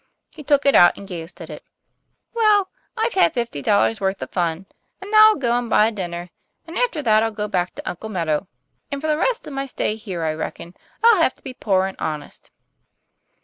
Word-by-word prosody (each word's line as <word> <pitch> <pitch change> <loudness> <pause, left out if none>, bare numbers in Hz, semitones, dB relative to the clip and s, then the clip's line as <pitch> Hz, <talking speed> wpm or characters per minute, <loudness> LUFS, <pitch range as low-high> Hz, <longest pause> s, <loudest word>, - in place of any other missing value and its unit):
He 310 - -12
took 285 0 +2
it 280 - +5
out 175 0 +6
and 200 - -10
gazed 170 -2 -8
at - - -9
it. - - -9 0.7
"Well, 425 -4 +3 0.3
I've 455 +1 0
had 375 - +3
fifty 235 - -3
dollars' 210 +4 +2
worth 190 0 -1
of - - -9
fun; 170 0 -2 0.3
and 390 +1 -9
now 430 0 +8
I'll 435 - +4
go 240 -4 0
and 245 -1 -2
buy 210 - +5
a 225 - +1
dinner, 175 -4 -6 0.3
and 330 +1 -10
after 415 -11 0
that 215 -3 +4
I'll 225 - +1
go 210 -1 -4
back 180 -3 -2
to - - -9
Uncle 200 +5 -5
Meadow; 170 -3 -1 0.4
and 280 - -3
for 305 - -7
the 305 -1 +2
rest 470 +9 -1
of 290 - -8
my 275 0 -3
stay 215 -4 -2
here 195 -7 -6
I 155 -1 0
reckon 170 +2 -6 0.3
I'll 455 -6 +6
have 260 - +2
to - - -27
be 265 - -7
poor 190 -6 +1
and 190 - -7
honest." 150 -2 -6
220 Hz, 225 wpm, -21 LUFS, 180-300 Hz, 0.7 s, now